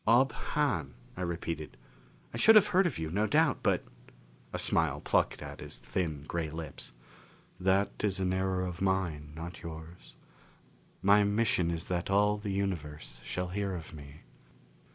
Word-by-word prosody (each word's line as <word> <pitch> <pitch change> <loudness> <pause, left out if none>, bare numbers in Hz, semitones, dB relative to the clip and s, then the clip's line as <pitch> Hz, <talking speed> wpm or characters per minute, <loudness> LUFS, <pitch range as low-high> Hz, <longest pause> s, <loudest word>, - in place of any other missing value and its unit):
"Ob 120 +3 +5
Hahn," 100 - -1 0.2
I 95 - -6
repeated. 85 -3 -4 0.6
"I - - -3
should 225 - +7
have 210 -2 +8
heard 185 -1 +4
of 155 - -3
you, 80 -1 -3
no 105 +4 +1
doubt, 150 -1 +3
but - - +2 0.3
" - - -28
A - - -3
smile 75 -4 +1
plucked - - +1
at - - -8
his - - -8
thin, 80 -6 -3
gray 85 -2 -2
lips. 80 -5 -7 0.7
"That 95 +2 +2
is 100 -2 +1
an 95 -1 +1
error 95 0 0
of 90 0 -6
mine, 90 -6 0
not 85 +2 -7
yours. 80 +1 -10 0.9
My 100 +2 +6
mission 100 -4 +2
is 85 -1 -3
that 90 0 -2
all 105 +1 +3
the 105 0 -5
universe 80 -10 -3
shall 90 0 -3
hear 100 0 -2
of 80 -3 -8
me." 70 0 -11
90 Hz, 165 wpm, -31 LUFS, 80-100 Hz, 0.9 s, have